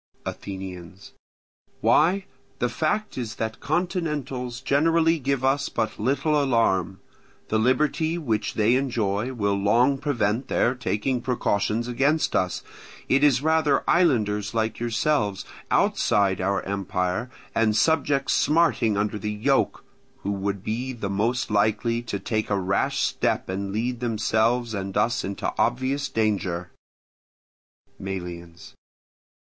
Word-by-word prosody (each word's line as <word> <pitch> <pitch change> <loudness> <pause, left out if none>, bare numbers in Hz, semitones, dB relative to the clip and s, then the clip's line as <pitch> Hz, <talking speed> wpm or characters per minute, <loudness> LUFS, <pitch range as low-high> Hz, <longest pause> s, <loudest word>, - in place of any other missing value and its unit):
Athenians. 95 -1 -7 0.7
Why, 185 +6 +3 0.3
the 125 - 0
fact 205 - -1
is 110 -4 -4
that 110 +1 -4
continentals 150 -7 -2
generally 165 +4 +2
give 135 -1 -1
us 135 +2 +1
but 110 -2 -2
little 145 +6 +1
alarm; 100 -7 +1 0.5
the 110 - +2
liberty 150 +7 +1
which 115 -10 -2
they 110 +2 +3
enjoy 120 -3 0
will 100 -5 0
long 115 +8 +3
prevent 125 -4 0
their 120 - +2
taking 125 0 -1
precautions 115 -2 0
against 140 +6 +1
us; 90 -1 0 0.5
it 135 +2 +3
is 140 -3 +4
rather 160 -3 +2
islanders 105 - +2
like 110 -1 -1
yourselves, 115 -4 0 0.2
outside 100 -3 +2
our 95 0 0
empire, 95 +3 -2 0.2
and 110 -1 +2
subjects 145 -3 +2
smarting 150 -9 +2
under 105 +1 -1
the 105 +2 -3
yoke, 125 +7 0 0.4
who 100 - -1
would 100 -1 -3
be 125 +5 -3
the 105 -5 -4
most 115 +5 0
likely 110 +3 +1
to 115 -4 -4
take 110 +2 -2
a 100 -1 +1
rash 95 +1 0
step - - 0
and 95 +1 -3
lead 120 +4 -2
themselves 115 +1 +1
and 95 -1 -3
us 120 +5 +1
into 100 +1 -3
obvious 130 +3 0
danger. 95 -6 -1 1.3
Melians. 85 -3 -7
115 Hz, 125 wpm, -25 LUFS, 100-135 Hz, 1.3 s, is